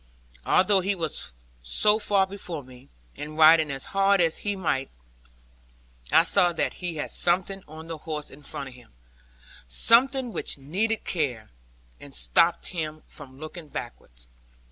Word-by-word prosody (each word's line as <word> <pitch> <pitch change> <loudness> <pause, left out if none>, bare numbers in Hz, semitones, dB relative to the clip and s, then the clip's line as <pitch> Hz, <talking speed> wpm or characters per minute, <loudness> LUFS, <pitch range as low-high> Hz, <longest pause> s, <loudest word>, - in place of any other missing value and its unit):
Although 190 +1 +5
he 195 +2 0
was 140 - -3 0.3
so 210 - +3
far 200 -3 +3
before 185 -6 -6
me, 130 +1 -16 0.3
and 150 +1 -7
riding 160 0 +7
as 135 -1 -4
hard 195 0 +4
as 165 -2 +2
ride - - -11
he 205 -1 -1
might, 135 -8 -1 1.2
I - - +6
saw 180 0 +3
that - - -1
he 175 -2 -3
had 150 - -4
something 185 +2 0
on 155 +2 -10
the 165 -1 -6
horse 150 -1 -5
in 140 - -13
front 140 -1 -5
of - - -14
him; 125 - -18 0.7
something 245 - +3
which - - -2
needed 200 +11 -2
care, 130 -10 -2 0.5
and 140 -1 -11
stopped 170 0 +2
him 155 -3 -5
from 135 -3 -8
looking 155 +1 -8
backward. - - -9
160 Hz, 155 wpm, -26 LUFS, 140-190 Hz, 1.2 s, riding